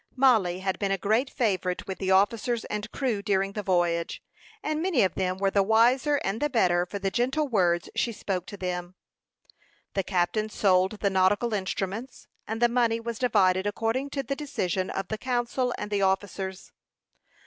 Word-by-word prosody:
Mollie 220 Hz, -9 st, +3 dB
had 190 Hz, -1 st, -2 dB
been 200 Hz, -, 0 dB
a 195 Hz, -, +1 dB
great 220 Hz, +8 st, +1 dB
favorite 185 Hz, -6 st, -1 dB
with 190 Hz, -, -6 dB
the 190 Hz, -, -2 dB
officers 220 Hz, +4 st, +2 dB
and 210 Hz, +1 st, -4 dB
crew 245 Hz, -7 st, -1 dB
during 195 Hz, -1 st, 0 dB
the 210 Hz, -, -4 dB
voyage, 175 Hz, -3 st, 0 dB, 0.4 s
and 310 Hz, -4 st, -1 dB
many 345 Hz, -, +2 dB
of 190 Hz, -, +1 dB
them 185 Hz, -1 st, -1 dB
were 195 Hz, 0 st, +1 dB
the 200 Hz, -, +3 dB
wiser 240 Hz, +8 st, +3 dB
and 195 Hz, +4 st, -2 dB
the 295 Hz, -, +1 dB
better 180 Hz, -8 st, +2 dB
for 200 Hz, -, -5 dB
the 195 Hz, -1 st, -2 dB
gentle 265 Hz, +7 st, 0 dB
words 175 Hz, -7 st, +1 dB
she 235 Hz, -, 0 dB
spoke 190 Hz, -4 st, -3 dB
to 205 Hz, -, -8 dB
them. 180 Hz, -1 st, -4 dB, 1.0 s
The 195 Hz, -, +1 dB
captain 190 Hz, +4 st, 0 dB
sold 190 Hz, -2 st, +2 dB
the 200 Hz, -, +2 dB
nautical 200 Hz, +5 st, +2 dB
instruments, 200 Hz, +4 st, -4 dB, 0.2 s
and 220 Hz, +1 st, -3 dB
the 240 Hz, -, +5 dB
money 235 Hz, -1 st, +1 dB
was 230 Hz, -1 st, -5 dB
divided 195 Hz, -6 st, +3 dB
according 225 Hz, +6 st, -1 dB
to 275 Hz, 0 st, -3 dB
the 275 Hz, +1 st, -3 dB
decision 190 Hz, -, -2 dB
of 195 Hz, -1 st, -4 dB
the 220 Hz, -, -3 dB
council 250 Hz, 0 st, -1 dB
and 210 Hz, 0 st, -5 dB
officers. 190 Hz, 0 st, -2 dB
205 Hz, 180 wpm, -27 LUFS, 190-240 Hz, 1.0 s, the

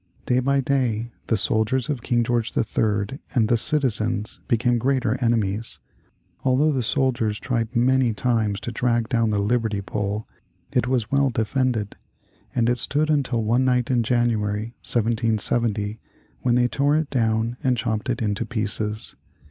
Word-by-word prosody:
Day 125 Hz, 0 st, +2 dB
by 140 Hz, +2 st, +1 dB
day 120 Hz, -4 st, -1 dB, 0.2 s
the 115 Hz, -, +2 dB
soldiers 110 Hz, +5 st, +2 dB
of 140 Hz, -5 st, -3 dB
King 120 Hz, +1 st, +1 dB
George 120 Hz, -1 st, -1 dB
III. 110 Hz, +3 st, 0 dB, 0.2 s
and 115 Hz, -4 st, +3 dB
the 120 Hz, -, +4 dB
citizens 115 Hz, -5 st, +2 dB
became 120 Hz, +1 st, +2 dB
greater 130 Hz, -2 st, +1 dB
enemies. 110 Hz, -2 st, 0 dB, 0.7 s
Although 135 Hz, +4 st, +3 dB
the 135 Hz, -3 st, 0 dB
soldiers 120 Hz, -4 st, 0 dB
tried 120 Hz, -2 st, -2 dB
many 125 Hz, 0 st, +3 dB
times 110 Hz, -3 st, 0 dB
to 120 Hz, -, -4 dB
drag 120 Hz, -1 st, 0 dB
down 115 Hz, -2 st, +1 dB
the 105 Hz, -, 0 dB
liberty 110 Hz, 0 st, 0 dB
pole, 105 Hz, +1 st, -3 dB, 0.4 s
it 120 Hz, -, +1 dB
was 125 Hz, -4 st, -1 dB
well 140 Hz, 0 st, +3 dB
defended, 115 Hz, -2 st, -1 dB, 0.6 s
and 115 Hz, -1 st, +2 dB
it 120 Hz, 0 st, +2 dB
stood 155 Hz, +2 st, +1 dB
until 130 Hz, -6 st, 0 dB
one 120 Hz, +4 st, +2 dB
night 125 Hz, -1 st, +1 dB
in 120 Hz, -2 st, +3 dB
January, 110 Hz, -2 st, 0 dB
1770, 110 Hz, -2 st, 0 dB, 0.4 s
when 120 Hz, -1 st, +2 dB
they 125 Hz, 0 st, +3 dB
tore 140 Hz, +4 st, +1 dB
it 155 Hz, -2 st, -2 dB
down 115 Hz, -1 st, 0 dB
and 125 Hz, -2 st, +2 dB
chopped 110 Hz, +1 st, -2 dB
it 120 Hz, -2 st, -1 dB
into 105 Hz, +1 st, -1 dB
pieces. 110 Hz, -1 st, -2 dB
115 Hz, 155 wpm, -23 LUFS, 110-125 Hz, 0.7 s, the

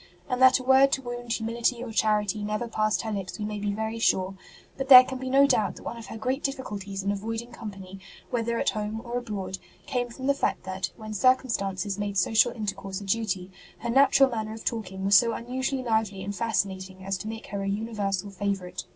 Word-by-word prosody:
and 250 Hz, 0 st, -2 dB
that 260 Hz, 0 st, +8 dB
a 255 Hz, -, -7 dB
word 265 Hz, +1 st, +5 dB
to -, -, +1 dB
wound 240 Hz, -2 st, -6 dB
humility 235 Hz, +1 st, 0 dB
or 240 Hz, -, -6 dB
charity 210 Hz, -1 st, +1 dB
never 215 Hz, +3 st, -2 dB
passed 215 Hz, -4 st, 0 dB
her 220 Hz, -, -3 dB
lips 195 Hz, -3 st, -4 dB
we 210 Hz, -, -3 dB
may 210 Hz, 0 st, -4 dB
be 205 Hz, 0 st, -1 dB
very 220 Hz, +2 st, -3 dB
sure; 190 Hz, -4 st, +2 dB, 0.4 s
but 270 Hz, 0 st, -4 dB
there 255 Hz, -2 st, +12 dB
can 260 Hz, 0 st, -6 dB
be 260 Hz, 0 st, -4 dB
no 275 Hz, +2 st, +6 dB
doubt 215 Hz, -7 st, +2 dB
that -, -, -12 dB
one -, -, -5 dB
of 230 Hz, -1 st, -9 dB
her 225 Hz, -, -7 dB
great 255 Hz, +5 st, -1 dB
difficulties 205 Hz, -8 st, -4 dB
in 200 Hz, -, +1 dB
avoiding 225 Hz, +4 st, -4 dB
company, 195 Hz, -4 st, -9 dB, 0.3 s
whether 235 Hz, -1 st, 0 dB
at -, -, +1 dB
home 215 Hz, +1 st, -3 dB
or 240 Hz, +1 st, -2 dB
abroad, 200 Hz, -5 st, -5 dB, 0.3 s
came 245 Hz, -2 st, -1 dB
from 260 Hz, +3 st, -8 dB
the 280 Hz, -, +4 dB
fact 275 Hz, -, -1 dB
that, 185 Hz, -1 st, -3 dB
when 215 Hz, -1 st, -7 dB
circumstances 205 Hz, -5 st, +1 dB
made 205 Hz, -1 st, -2 dB
social 225 Hz, +6 st, +4 dB
intercourse 195 Hz, -4 st, -4 dB
a -, -, -9 dB
duty, 195 Hz, -3 st, -1 dB, 0.3 s
her 235 Hz, +1 st, -3 dB
natural 270 Hz, +1 st, +6 dB
manner 220 Hz, -2 st, -3 dB
of 225 Hz, -, -10 dB
talking 190 Hz, -4 st, -3 dB
was 200 Hz, +1 st, +5 dB
so 230 Hz, +4 st, +5 dB
unusually 260 Hz, +3 st, -2 dB
lively 220 Hz, -5 st, 0 dB
and 200 Hz, +1 st, -4 dB
fascinating 190 Hz, -4 st, -2 dB
as 195 Hz, 0 st, -1 dB
to 200 Hz, +3 st, -6 dB
make 225 Hz, 0 st, -6 dB
her 200 Hz, 0 st, -4 dB
a 195 Hz, -, -3 dB
universal 205 Hz, -2 st, -2 dB
favourite. 190 Hz, -2 st, -3 dB
220 Hz, 215 wpm, -27 LUFS, 195-240 Hz, 0.4 s, there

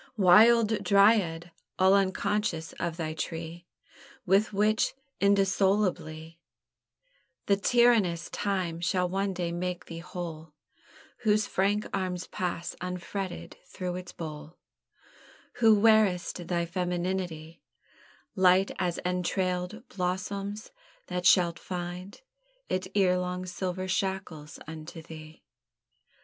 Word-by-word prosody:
Wild 215 Hz, +3 st, +5 dB
Dryad! 200 Hz, -5 st, +3 dB, 0.3 s
all 190 Hz, +1 st, +5 dB
unconscious 195 Hz, -3 st, 0 dB
of 170 Hz, -1 st, -3 dB
thy 160 Hz, -2 st, -3 dB
tree, 165 Hz, +2 st, -6 dB, 0.6 s
With 195 Hz, +4 st, +3 dB
which 215 Hz, +4 st, +1 dB, 0.2 s
indissolubly 190 Hz, -5 st, +1 dB, 1.1 s
The 200 Hz, -, +4 dB
tyrannous 205 Hz, -6 st, +3 dB
time 185 Hz, -5 st, -2 dB
shall 180 Hz, 0 st, +1 dB
one 195 Hz, +2 st, -1 dB
day 175 Hz, -2 st, -3 dB
make 180 Hz, +1 st, -3 dB
thee 165 Hz, 0 st, -8 dB
whole; 165 Hz, -3 st, -7 dB, 0.7 s
Whose 215 Hz, -2 st, +2 dB
frank 205 Hz, +2 st, 0 dB
arms 185 Hz, -2 st, -2 dB
pass 175 Hz, -1 st, -4 dB
unfretted 180 Hz, +1 st, -5 dB
through 180 Hz, -2 st, -5 dB
its 180 Hz, 0 st, -7 dB
bole: 155 Hz, 0 st, -8 dB, 1.0 s
Who 220 Hz, -3 st, +5 dB
wear'st 200 Hz, -5 st, +3 dB
thy 170 Hz, -1 st, 0 dB
femineity 175 Hz, -2 st, -3 dB, 0.8 s
Light 185 Hz, 0 st, +4 dB
as 175 Hz, -2 st, -1 dB
entrailèd 180 Hz, +4 st, -2 dB
blossoms, 195 Hz, +3 st, -3 dB, 0.4 s
that 180 Hz, +1 st, 0 dB
shalt 175 Hz, -3 st, +4 dB
find 180 Hz, +2 st, -6 dB, 0.5 s
It 185 Hz, 0 st, -1 dB
erelong 180 Hz, -2 st, +1 dB
silver 185 Hz, 0 st, -3 dB
shackles 185 Hz, -5 st, -3 dB
unto 160 Hz, +1 st, -8 dB
thee. 155 Hz, -1 st, -12 dB
180 Hz, 100 wpm, -28 LUFS, 170-195 Hz, 1.1 s, Wild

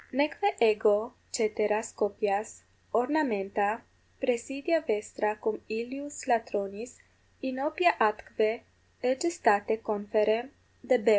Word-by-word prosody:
Neque 300 Hz, +9 st, +1 dB
ego 220 Hz, 0 st, +4 dB, 0.2 s
ceteras 215 Hz, 0 st, 0 dB
copias, 205 Hz, 0 st, -1 dB, 0.3 s
ornamenta, 220 Hz, -5 st, +1 dB, 0.3 s
praesidia 270 Hz, +6 st, 0 dB
vestra 210 Hz, -5 st, -1 dB
cum 220 Hz, -, -2 dB
illius 265 Hz, +6 st, -5 dB
latronis 225 Hz, -1 st, -1 dB, 0.5 s
inopia 300 Hz, +7 st, +2 dB
atque 220 Hz, +1 st, +1 dB, 0.4 s
egestate 255 Hz, -, +2 dB
conferre 215 Hz, +3 st, +1 dB, 0.3 s
debeo. 245 Hz, -3 st, +3 dB
225 Hz, 80 wpm, -29 LUFS, 210-265 Hz, 0.5 s, ego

